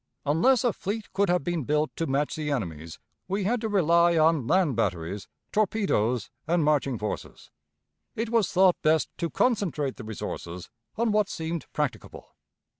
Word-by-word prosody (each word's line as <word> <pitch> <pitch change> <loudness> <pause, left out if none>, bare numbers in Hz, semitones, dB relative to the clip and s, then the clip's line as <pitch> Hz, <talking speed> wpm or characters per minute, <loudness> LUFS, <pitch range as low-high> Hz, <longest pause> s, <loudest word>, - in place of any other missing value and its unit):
Unless 175 - +3
a 240 -4 +2
fleet 205 +2 -5
could 200 -1 +2
have 180 -3 +2
been 175 -2 -1
built 150 +3 0
to 165 - -1
match 140 +2 0
the 155 -1 -3
enemy's, 85 - -4 0.3
we 195 +2 -1
had 230 +4 0
to 220 - -2
rely 170 -3 +4
on 155 -5 +3
land 175 -7 +3
batteries, 95 -3 -2 0.2
torpedoes, 190 - +1 0.2
and 170 0 +2
marching 145 -4 +1
forces. 105 0 -6 0.6
It 225 +1 -3
was 225 -5 +2
thought 185 -1 +4
best 155 0 +2
to 170 - -1
concentrate 175 - 0
the 125 - -8
resources 90 -5 -6 0.2
on 230 0 +1
what 210 -1 +2
seemed 160 0 -4
practicable. 150 -3 -4
165 Hz, 160 wpm, -27 LUFS, 135-200 Hz, 0.6 s, rely